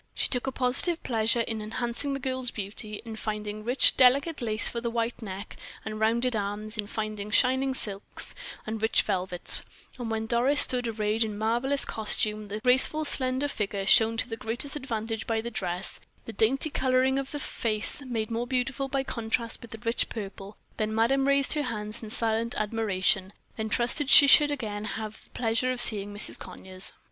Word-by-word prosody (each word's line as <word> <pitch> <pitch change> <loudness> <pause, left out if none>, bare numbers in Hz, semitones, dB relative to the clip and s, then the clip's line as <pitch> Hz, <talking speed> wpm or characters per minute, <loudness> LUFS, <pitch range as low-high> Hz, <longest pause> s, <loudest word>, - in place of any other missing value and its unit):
She - - +1
took 250 0 -1
a - - 0
positive 265 +7 0
pleasure 230 0 +1
in 225 -1 -4
enhancing 240 +6 -3
the - - -4
girl's 260 -1 -2
beauty, 210 0 -6
in 225 -1 -7
finding 215 -1 -5
rich, 245 +4 +4
delicate 275 +5 +4
lace 220 -2 0
for 235 - -3
the 235 - -2
white 230 +1 -3
neck 200 0 -8 0.3
and 215 0 -5
rounded 235 +3 +1
arms, 210 +1 -3
in 210 -2 -3
finding 215 -1 -5
shining 260 +4 +2
silks 200 -5 -5 0.3
and 220 0 -5
rich 220 0 +3
velvets; 185 -3 +4 0.4
and 240 -2 -4
when 220 0 -2
Doris 250 +5 +2
stood 250 -3 +4
arrayed 215 0 0
in 215 -2 -5
marvelous 240 +6 +2
costume, 215 -1 0
the 205 +1 -5
graceful, 265 +5 +4
slender 260 0 0
figure 200 -6 -3
shown 225 +3 +5
to 235 - 0
the 225 -2 -6
greatest 240 +6 -4
advantage 225 -5 -4
by 225 -1 0
the 235 +2 -5
dress 180 -4 -3 0.3
the 225 - -8
dainty 270 +8 +1
coloring 260 0 +1
of 275 0 -5
the 295 - -4
face 220 -1 -2
made 230 -4 -4
more 235 +2 -2
beautiful 260 +1 -2
by 270 0 -1
contrast 230 -2 -3
with 235 - -11
the 225 - -8
rich 230 +1 0
purple, 200 -1 -8 0.2
then 215 0 -2
madame 270 +5 +2
raised 280 -1 +4
her 300 - -1
hands 215 -4 -4
in 220 - -8
silent 230 +1 -1
admiration, 205 -3 0 0.2
then 220 -1 -4
trusted 255 +5 0
she 285 - +10
should 290 +1 +7
again 215 -8 -4
have 215 0 -6
the - - -26
pleasure 235 +2 -1
of 250 - -2
seeing 205 -4 +4
Mrs. 205 +1 +1
Conyers. 185 0 -1
225 Hz, 185 wpm, -27 LUFS, 215-255 Hz, 0.4 s, she